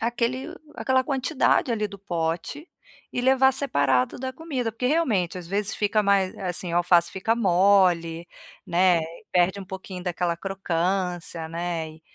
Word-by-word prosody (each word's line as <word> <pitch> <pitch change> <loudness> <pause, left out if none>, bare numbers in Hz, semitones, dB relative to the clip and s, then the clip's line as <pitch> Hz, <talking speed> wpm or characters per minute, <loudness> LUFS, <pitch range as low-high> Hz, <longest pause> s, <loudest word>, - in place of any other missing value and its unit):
aquele 240 +6 -2 0.2
aquela 260 0 +2
quantidade 265 -1 +1
ali 215 -2 0
do 200 0 -11
pote 175 - -3 0.4
e 245 - -1
levar 265 +1 +4
separado 140 - +1
da 260 +1 -4
comida. 260 -7 -3
Porque, 250 +3 -2
realmente, 220 - +1
às 175 - -9
vezes 205 +3 -1
fica 210 +1 +1
mais 195 -2 +2
eh, - - -10
assim, 175 -1 -2
o - - +1
alface 175 -1 +3
fica 210 +4 0
mole, 180 -4 +3 0.4
né, 175 0 +3
e 165 +1 -10
perde 185 +2 +2
um - - -7
pouquinho 190 -1 -8
daquela 175 -1 -1
crocância, 180 -2 -2
né, 170 -1 -3
e 155 0 -16
190 Hz, 160 wpm, -25 LUFS, 175-240 Hz, 0.4 s, levar